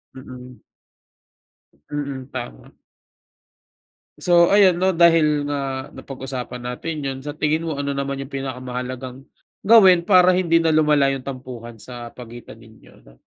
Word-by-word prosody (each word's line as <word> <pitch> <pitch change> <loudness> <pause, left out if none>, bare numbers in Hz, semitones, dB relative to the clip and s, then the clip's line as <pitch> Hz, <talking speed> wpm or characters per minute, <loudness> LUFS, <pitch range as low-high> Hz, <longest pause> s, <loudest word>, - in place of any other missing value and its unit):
Mm. 125 -1 -12 1.3
Mm, 140 -3 -5
tama. 120 -2 -8 1.5
So, 170 -1 +4
ayan 195 -3 +5
'no, 185 +2 +1
dahil 165 -4 +3
nga 135 -2 -4
napag-usapan 130 -2 -7
natin 140 +6 -5
yun, 135 -2 -4
sa 145 - -5
tingin 155 +2 -1
mo, 160 -4 -4
ano 140 0 -2
naman 140 0 -3
yung 135 +1 -8
pinakamahalagang 130 -1 -6 0.4
gawin 195 -5 +6
para 185 -1 +5
hindi 170 -2 +2
na 165 -1 +1
lumala 150 -2 +3
yung 135 - -8
tampuhan 125 -4 -9
sa 120 0 -9
pagitan 120 -2 -12
ninyo, 110 -1 -18 0.2
'no? - - -20
140 Hz, 130 wpm, -21 LUFS, 125-165 Hz, 1.5 s, gawin